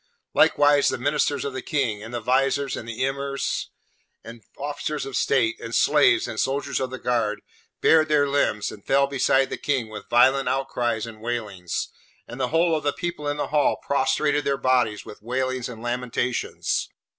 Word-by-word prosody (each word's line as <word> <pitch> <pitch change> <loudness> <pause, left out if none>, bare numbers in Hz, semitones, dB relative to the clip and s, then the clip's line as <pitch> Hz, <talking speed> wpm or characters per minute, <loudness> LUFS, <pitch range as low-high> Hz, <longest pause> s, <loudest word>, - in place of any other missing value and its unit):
Likewise 145 0 +4
the - - +1
ministers 145 +2 0
of 140 - -3
the 130 - -4
King, 130 -9 -1
and 115 +2 -9
the 120 - -3
Viziers 135 +3 +1
and 115 - -7
Emirs 135 +3 -2 0.6
and 115 0 -11 0.2
officers 145 +1 -3
of 135 - -6
state, 120 -5 +1
and 115 0 -5
slaves, 145 -6 +4
and 110 - -5
soldiers 140 +1 -1
of 130 - -2
the 130 - -6
guard, 115 -4 -1 0.4
bared 160 -1 +5
their 150 -2 +3
limbs, 140 -7 0
and - - -12
fell 140 +1 +3
beside 135 -1 +2
the - - -3
King 130 -6 -1
with 105 0 -9
violent 130 +3 +4
outcries 120 -4 -1
and 110 -2 -11
wailings; 105 -7 -3 0.4
and 120 - -9
the 130 - +1
whole 165 +3 +2
of 155 - -3
the 145 - +1
people 170 -4 -4
in 145 0 -1
the 145 - -2
Hall 150 -1 +2
prostrated 145 +2 +1
their 140 0 0
bodies 125 -6 +1
with 105 - -11
wailings 130 +2 -2
and 115 -2 -9
lamentations. 125 0 -2
130 Hz, 180 wpm, -24 LUFS, 120-140 Hz, 0.6 s, bared